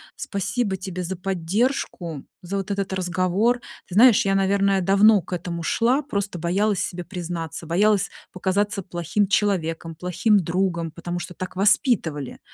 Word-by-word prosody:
Спасибо 200 +1 -2
тебе 185 -1 -5
за 185 +2 -3
поддержку, 180 - -2 0.2
за 190 +3 -3
вот 195 +1 -4
этот 195 -1 -2
разговор. 185 +6 +1 0.3
Ты 180 - -8
знаешь, 235 0 +7
я, 195 0 +2
наверное, 195 0 +2
давно 200 +3 +5
к - - -8
этому 170 -1 -4
шла, 245 - +2
просто 200 -9 -3
боялась 195 +4 +1
себе 175 -1 -3
признаться, 170 -3 -5
боялась 200 +4 +2 0.2
показаться 195 +2 -1
плохим 175 +3 -1
человеком, 170 -5 0
плохим 180 +6 +2
другом, 170 -1 -1
потому 175 +2 -5
что 180 - -7
так 185 +1 -7
воспитывали. 185 - +1
190 Hz, 145 wpm, -23 LUFS, 175-205 Hz, 0.3 s, знаешь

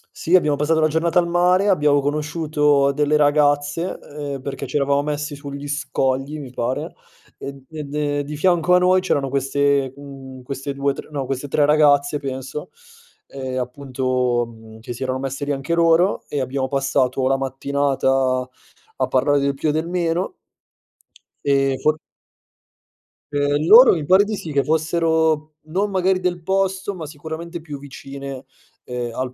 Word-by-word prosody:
Sì, 170 - +2
abbiamo 150 -5 +3
passato 155 +3 +1
la 155 - +4
giornata 165 +3 0
al 175 -1 +4
mare, 180 +3 +3
abbiamo 150 -6 +3
conosciuto 150 -1 +1
delle 150 +1 +2
ragazze, 145 +3 +2 0.4
ehm, 135 - -7
perché 135 -1 -5
ci - - -8
eravamo 140 0 +2
messi 150 0 -3
sugli 140 0 -7
scogli, 140 0 -1
mi 135 -4 -8
pare, 125 +1 -3 0.5
ed 135 -1 -8
e 155 -1 -5
de 145 0 -2
di 150 +2 -6
fianco 180 +1 +3
a - - +7
noi 185 +1 +4
c'erano 140 -7 0
queste 140 0 +1
mhmm, 135 -2 -11
queste 135 +1 -5
2, 140 0 0
tr - - -10
no, 140 -3 -3
queste 135 +2 -4
3 145 +1 +2
ragazze 145 -1 +3
penso, 135 +1 -6 0.6
e 130 -1 -5
appunto, 125 -1 -1
mhmm, 110 -1 -14
che 120 - -6
si 120 - -11
erano 130 0 -1
messe 135 +2 -4
lì 145 - -2
anche 135 +4 -2
loro, 170 +3 +3
e 145 - -1
abbiamo 130 +1 -2
passato 135 -1 0
la 135 - +3
mattinata 135 -1 0 0.5
a - - 0
parlare 145 +2 +2
del 140 0 0
più 145 +3 -2
e - - +3
del 160 +2 -1
meno 175 - -1 1.1
ehm, 135 -1 +2
for 155 0 +3 1.3
Ehm, 145 +1 +1
loro 245 +6 +9
mi 155 -4 -2
pare 190 +5 +6
di 215 +1 -3
sì 165 -5 -7
che 140 -1 +2
fossero 160 -1 +1
non 185 +7 -1
magari 190 -1 +1
del 180 -1 -2
posto, 190 +1 0
ma 170 -4 -7
sicuramente 160 +3 -7
più 150 -3 -8
vicine, 140 -1 -8 0.4
ehm, 120 -1 -5
al 130 -1 -3
145 Hz, 165 wpm, -21 LUFS, 135-160 Hz, 1.3 s, loro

